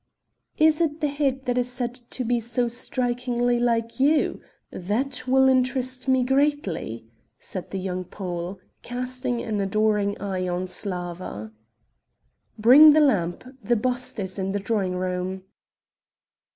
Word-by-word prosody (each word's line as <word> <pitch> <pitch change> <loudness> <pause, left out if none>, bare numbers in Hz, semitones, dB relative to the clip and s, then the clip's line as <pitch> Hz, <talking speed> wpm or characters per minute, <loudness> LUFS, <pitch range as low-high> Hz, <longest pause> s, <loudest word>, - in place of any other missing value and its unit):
"Is 315 +1 +4
it 315 -2 0
the 300 - +1
head 275 -2 -1
that 250 0 +1
is 245 0 -1
said 245 -1 -3
to 250 +1 -4
be 240 0 +1
so 240 +2 -1
strikingly 245 0 -1
like 230 0 0
you? 290 +3 +2 0.3
that 255 +8 -2
will 265 +1 +5
interest 255 0 +1
me 260 -1 +3
greatly," 265 - 0 0.3
said 185 +5 -6
the 195 - -4
young 185 -1 -3
Pole, 180 0 -5 0.2
casting 250 0 -3
an 215 -3 -2
adoring 210 0 +1
eye 190 -2 -2
on 180 0 -1
Slawa. 180 - -5 1.1
"Bring 270 +8 +8
the 310 - +5
lamp, 195 - +2 0.2
the 240 - +2
bust 250 +2 -2
is 190 -1 -4
in 190 0 -2
the 205 - 0
drawing 195 -3 -1
room." 185 +1 -3
240 Hz, 140 wpm, -24 LUFS, 190-255 Hz, 1.1 s, Bring